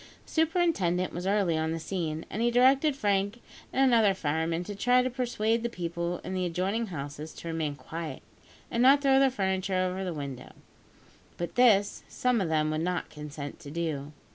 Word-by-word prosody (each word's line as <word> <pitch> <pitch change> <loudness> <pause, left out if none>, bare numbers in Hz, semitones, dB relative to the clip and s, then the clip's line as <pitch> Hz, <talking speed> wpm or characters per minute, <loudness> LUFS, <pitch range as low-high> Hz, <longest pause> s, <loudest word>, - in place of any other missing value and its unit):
The - - -16
superintendent 320 - +1
was 180 +2 -4
early 195 -4 +2
on 160 0 0
the 165 - -3
scene, 160 -2 -3
and 215 - -3
he 240 - +3
directed 270 +4 +4
Frank 205 -2 0 0.3
and 270 - +3
another 225 -6 +4
fireman 160 +1 -1
to 205 - -6
try 245 +5 +3
to 255 - -1
persuade 235 -3 0
the 235 - -1
people 170 -3 -3
in 185 - -5
the 185 -1 -1
adjoining 190 +6 -1
houses 150 -2 -7
to - - -9
remain 160 -3 -2
quiet, 160 +2 -7 0.5
and 235 - 0
not 275 +3 +6
throw 270 -1 +5
their 270 0 +5
furniture 190 -4 -1
over 185 +1 -1
the 185 - -2
window; 140 -5 -7 0.8
but 175 - -4
this, 210 -5 +4
some 250 -3 +1
of 175 - -1
them 155 -1 +1
would 155 0 -1
not 180 +1 -2
consent 150 -1 -7
to 140 - -10
do. 150 -3 -3
185 Hz, 190 wpm, -28 LUFS, 160-235 Hz, 0.8 s, not